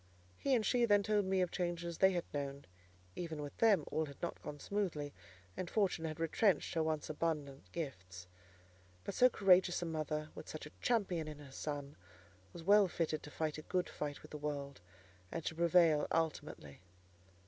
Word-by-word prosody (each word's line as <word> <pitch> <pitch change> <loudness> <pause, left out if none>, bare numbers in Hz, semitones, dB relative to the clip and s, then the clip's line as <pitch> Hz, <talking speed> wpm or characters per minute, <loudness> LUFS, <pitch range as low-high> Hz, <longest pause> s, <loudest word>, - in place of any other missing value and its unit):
He 270 - +3
and 220 -3 +1
she 240 +3 +3
then 205 -2 +4
told 210 -1 +2
me 190 0 +2
of 180 - 0
changes 175 -2 -2
they 190 0 +6
had 175 -1 0
known: 140 -1 -4 0.5
even 165 -3 -4
with 145 -1 -6
them 205 -9 +4
all 155 0 0
had 140 - -11
not 170 - -4
gone 145 - -7
smoothly, 165 -8 -2 0.4
and 180 - -4
fortune 190 -6 +1
had 155 0 -4
retrenched 180 +5 +2
her 165 - +1
once 155 -1 -1
abundant 150 -3 -3
gifts. 95 - -6 0.8
But - - -4
so 250 - +6
courageous 185 -5 +4
a - - -2
mother, 155 -1 -2
with - - -9
such 155 - -6
a 150 - -10
champion 190 -9 +1
in 150 -1 -6
her 145 -2 -12
son, 145 0 -5 0.5
was 170 - -9
well 200 +2 +6
fitted 160 -3 -1
to - - -9
fight 155 0 -2
a - - -6
good 180 +3 -1
fight 145 -1 -5
with - - -13
the 150 - -6
world, 140 -5 -4 0.5
and 165 - -4
to - - -1
prevail 165 -2 +4
ultimately. 155 - -2
160 Hz, 185 wpm, -36 LUFS, 150-185 Hz, 0.8 s, they